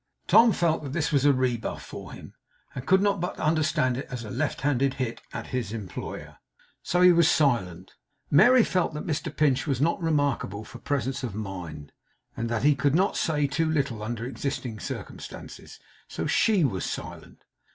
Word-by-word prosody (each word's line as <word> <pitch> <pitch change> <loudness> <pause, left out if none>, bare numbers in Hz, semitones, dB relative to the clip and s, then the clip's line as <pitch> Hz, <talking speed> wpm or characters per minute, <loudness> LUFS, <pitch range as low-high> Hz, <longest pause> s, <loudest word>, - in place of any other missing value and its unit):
Tom 230 0 +6
felt 170 -4 +1
that 140 -3 -6
this 155 -2 0
was 140 -2 +2
a 145 - +7
rebuff 125 -3 -1
for - - -9
him, - - -11 0.4
and 125 - -7
could 190 +1 +4
not 200 -2 +2
but 180 - -3
understand 150 -5 +1
it 135 - -5
as 125 -2 -5
a 105 - -7
left - - -2
handed 135 -1 +1
hit 125 -3 -3
at 115 -1 -5
his 125 -5 -2
employer. 105 -5 -7 0.4
So 180 - 0
he 180 0 +8
was 170 -2 +5
silent. 95 - +1 0.4
Mary 245 - +7
felt 180 -6 0
that 150 - -5
Mr 155 -2 -2
Pinch 145 -1 +2
was 135 -4 0
not 165 +5 +1
remarkable 145 - 0
for - - -11
presence 135 -2 -2
of 120 -6 -5
mind, 90 -8 -7 0.4
and 115 0 -3
that 115 -1 -1
he 150 +1 +6
could 140 +1 +1
not 190 +3 +2
say 150 -3 +1
too 160 +3 0
little 140 -8 -1
under 115 +1 -4
existing 130 -3 -4
circumstances. - - -8 0.3
So - - -4
SHE 210 -6 +3
was 100 -10 0
silent. - - -7
140 Hz, 185 wpm, -26 LUFS, 115-160 Hz, 0.4 s, he